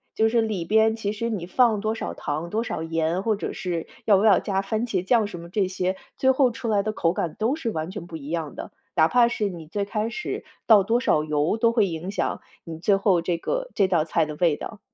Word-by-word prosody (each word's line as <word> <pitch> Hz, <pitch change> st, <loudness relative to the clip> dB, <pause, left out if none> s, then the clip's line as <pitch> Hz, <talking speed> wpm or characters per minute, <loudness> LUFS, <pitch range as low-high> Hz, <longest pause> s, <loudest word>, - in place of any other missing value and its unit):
就 220 Hz, 0 st, +3 dB
是 230 Hz, 0 st, +3 dB
里 210 Hz, -6 st, -2 dB
边 220 Hz, +3 st, +3 dB
其 205 Hz, -2 st, -2 dB
实 230 Hz, +2 st, -3 dB
你 195 Hz, -6 st, -3 dB
放 220 Hz, +1 st, +3 dB
多 215 Hz, +1 st, 0 dB
少 -, -, -4 dB
糖 155 Hz, +4 st, -4 dB
多 225 Hz, +4 st, -1 dB
少 160 Hz, -, -4 dB
盐， 165 Hz, +2 st, -1 dB
或 220 Hz, -2 st, +1 dB
者 -, -, -4 dB
是 175 Hz, -3 st, -4 dB, 0.2 s
要 205 Hz, -3 st, +6 dB
不 200 Hz, -, +1 dB
要 210 Hz, -4 st, +6 dB
加 195 Hz, -1 st, -1 dB
番 220 Hz, +4 st, -2 dB
茄 185 Hz, -5 st, -1 dB
酱 225 Hz, -1 st, +3 dB
什 175 Hz, -4 st, -8 dB
么 170 Hz, -, -10 dB
这 195 Hz, 0 st, +1 dB
些， 185 Hz, 0 st, -2 dB, 0.2 s
最 265 Hz, 0 st, +4 dB
后 260 Hz, -2 st, +3 dB
出 230 Hz, 0 st, -5 dB
来 205 Hz, -2 st, +2 dB
的 215 Hz, 0 st, -2 dB
口 165 Hz, -, +1 dB
感 165 Hz, -4 st, -3 dB
都 230 Hz, +7 st, +1 dB
是 255 Hz, -8 st, -2 dB
完 160 Hz, -5 st, -3 dB
全 170 Hz, -, -7 dB
不 165 Hz, -, -9 dB
一 145 Hz, 0 st, -9 dB
样 160 Hz, -3 st, -3 dB
的。 -, -, -7 dB, 0.2 s
哪 160 Hz, +1 st, +4 dB
怕 245 Hz, -1 st, +5 dB
是 210 Hz, -4 st, -1 dB
你 165 Hz, -4 st, -9 dB
最 200 Hz, +4 st, -2 dB
开 215 Hz, +2 st, -2 dB
始 355 Hz, +9 st, -5 dB, 0.2 s
倒 215 Hz, -4 st, +7 dB
多 230 Hz, +5 st, +2 dB
少 150 Hz, -11 st, +2 dB
油 150 Hz, +6 st, 0 dB
都 230 Hz, +1 st, +3 dB
会 220 Hz, -4 st, +4 dB
影 170 Hz, +3 st, -5 dB
响 -, -, -2 dB, 0.2 s
你 165 Hz, -2 st, -8 dB
最 200 Hz, +2 st, +3 dB
后 195 Hz, -3 st, +2 dB
这 170 Hz, 0 st, -1 dB
个 -, -, -3 dB
这 195 Hz, -2 st, +3 dB
道 165 Hz, -4 st, +2 dB
菜 165 Hz, 0 st, +1 dB
的 150 Hz, -1 st, -6 dB
味 165 Hz, -4 st, +3 dB
道。 220 Hz, +5 st, -8 dB
200 Hz, 275 characters per minute, -24 LUFS, 170-220 Hz, 0.2 s, 倒